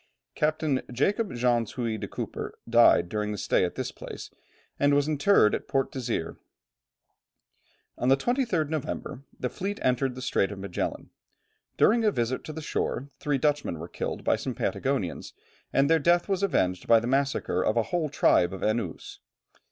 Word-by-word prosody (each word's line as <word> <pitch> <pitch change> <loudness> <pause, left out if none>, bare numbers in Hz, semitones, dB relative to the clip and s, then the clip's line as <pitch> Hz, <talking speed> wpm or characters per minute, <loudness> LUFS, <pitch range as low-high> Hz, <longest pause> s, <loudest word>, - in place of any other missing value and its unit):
Captain 155 -3 0
Jacob 200 - +1
Jansz 120 -2 +1
Huy 115 -3 -2
de - - -5
Cooper, - - -6
died 120 -6 +5
during 105 +2 -2
the 105 - -4
stay - - +1
at - - -2
this - - -3
place, - - -9 0.5
and 145 0 +4
was 145 0 +2
interred 150 - +4
at - - -3
Port 135 -1 0
Desire. 120 -10 -3 1.6
On 125 - +1
the 135 - +5
23rd 235 - 0
November, 150 -2 -4 0.2
the 125 - -1
fleet 200 +10 -4
entered 125 0 +1
the 130 - -7
Strait 100 -5 +1
of 100 - -7
Magellan. 95 -2 -4 0.7
During 230 +2 +4
a 215 - +5
visit 125 - -1
to - - -6
the 155 0 -7
shore 140 -1 -2
three 145 -2 0
Dutchmen 145 - 0
were 80 +2 -7
killed - - -5
by - - +2
some - - -4
Patagonians, - - -2 0.4
and 135 +1 +3
their 165 +1 +4
death 175 +3 +3
was 195 -2 0
avenged 90 - 0
by 115 -1 +7
the 115 - -5
massacre 135 +2 0
of 110 - +1
a 115 - +3
whole 165 -4 +1
tribe 90 -9 +3
of 95 - -6
Enoos. 110 -5 -2
135 Hz, 175 wpm, -27 LUFS, 115-155 Hz, 1.6 s, by